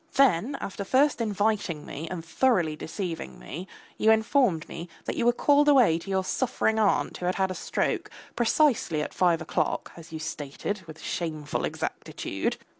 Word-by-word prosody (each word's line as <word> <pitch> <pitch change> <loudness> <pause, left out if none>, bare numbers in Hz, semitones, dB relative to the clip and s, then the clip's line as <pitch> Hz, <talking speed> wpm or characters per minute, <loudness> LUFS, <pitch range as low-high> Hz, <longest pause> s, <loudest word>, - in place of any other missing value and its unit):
Then 265 -1 +3
after 200 +1 -5
first 260 +5 +3
inviting 205 -7 0
me 155 +4 -6
and 170 -3 -5
thoroughly 175 -5 +2
deceiving 165 - -5
me, 155 - -7 0.3
you 220 - +4
informed 220 - +3
me 170 +1 -7 0.2
that - - -2
you 240 - +1
were - - +7
called 290 +4 +4
away 245 - +5
to 180 - -10
your 190 -1 +1
suffering 220 +1 0
aunt 210 -2 +2
who 180 - -3
had 180 - +1
had 190 -1 +1
a - - -1
stroke, - - -1 0.3
precisely 235 - +2
at - - -6
five 170 -3 +2
o'clock - - -1
as 170 0 -12
you 160 - -4
stated 155 +5 -4
with 155 0 -10
shameful 155 -3 -3
exactitude. - - -3
190 Hz, 170 wpm, -27 LUFS, 160-230 Hz, 0.3 s, were